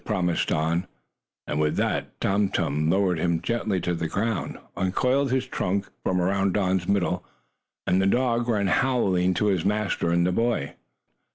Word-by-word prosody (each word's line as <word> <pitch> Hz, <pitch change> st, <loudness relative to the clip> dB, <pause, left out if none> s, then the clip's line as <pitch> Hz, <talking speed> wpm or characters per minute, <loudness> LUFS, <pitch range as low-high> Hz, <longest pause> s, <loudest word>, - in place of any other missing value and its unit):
promised 90 Hz, -5 st, 0 dB
Don, 85 Hz, +4 st, 0 dB, 0.6 s
and 75 Hz, -, -2 dB
with 75 Hz, 0 st, +1 dB
that -, -, -2 dB
Tum 100 Hz, 0 st, +1 dB
Tum 75 Hz, -1 st, 0 dB
lowered 95 Hz, -2 st, +2 dB
him 85 Hz, -1 st, +1 dB
gently 110 Hz, -2 st, -1 dB
to 90 Hz, -, -1 dB
the 85 Hz, -1 st, -2 dB
ground, 105 Hz, +3 st, -2 dB, 0.2 s
uncoiled 125 Hz, +9 st, +1 dB
his 130 Hz, 0 st, 0 dB
trunk 100 Hz, -5 st, -2 dB, 0.2 s
from 90 Hz, -1 st, +1 dB
around 95 Hz, +1 st, +1 dB
Don's 95 Hz, -3 st, +1 dB
middle, 90 Hz, -2 st, 0 dB, 0.6 s
and 95 Hz, -, +2 dB
the 95 Hz, -, +2 dB
dog 120 Hz, +1 st, +1 dB
ran 105 Hz, -3 st, +1 dB
howling 95 Hz, -5 st, +2 dB
to 105 Hz, -, +1 dB
his 95 Hz, -5 st, +1 dB
master 105 Hz, -4 st, 0 dB
and 85 Hz, 0 st, +2 dB
the 90 Hz, -, +2 dB
boy. 115 Hz, -8 st, 0 dB
95 Hz, 165 wpm, -25 LUFS, 90-105 Hz, 0.6 s, lowered